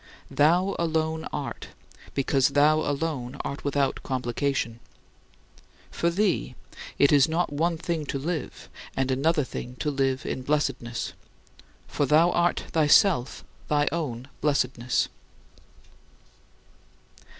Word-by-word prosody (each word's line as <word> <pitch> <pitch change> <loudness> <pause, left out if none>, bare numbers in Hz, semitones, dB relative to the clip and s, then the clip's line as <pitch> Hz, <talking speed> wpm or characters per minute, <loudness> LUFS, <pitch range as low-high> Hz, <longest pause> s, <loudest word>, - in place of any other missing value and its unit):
Thou 175 +6 +3
alone 160 -1 0
art, - - -5 0.5
because 135 -1 +2
thou 150 +2 +4
alone 145 -4 -2
art 140 - -5
without 140 -1 0
complication. 125 -2 -2 1.1
For 170 - 0
thee 175 - 0 0.4
it 140 - +5
is 145 0 +5
not 165 -1 0
one 165 +3 0
thing 160 -2 -3
to - - -2
live 155 +3 -4 0.3
and 135 0 +1
another 150 +4 +2
thing 125 -1 -7
to 150 +3 -2
live 135 -1 0
in - - -3
blessedness; 130 -4 -2 0.7
for 145 - -1
thou 160 +5 +5
art 175 0 +1
thyself 155 -2 +3 0.2
thy 145 -1 +2
own 130 -7 -3
blessedness. 130 -4 +1
145 Hz, 110 wpm, -26 LUFS, 130-160 Hz, 1.1 s, it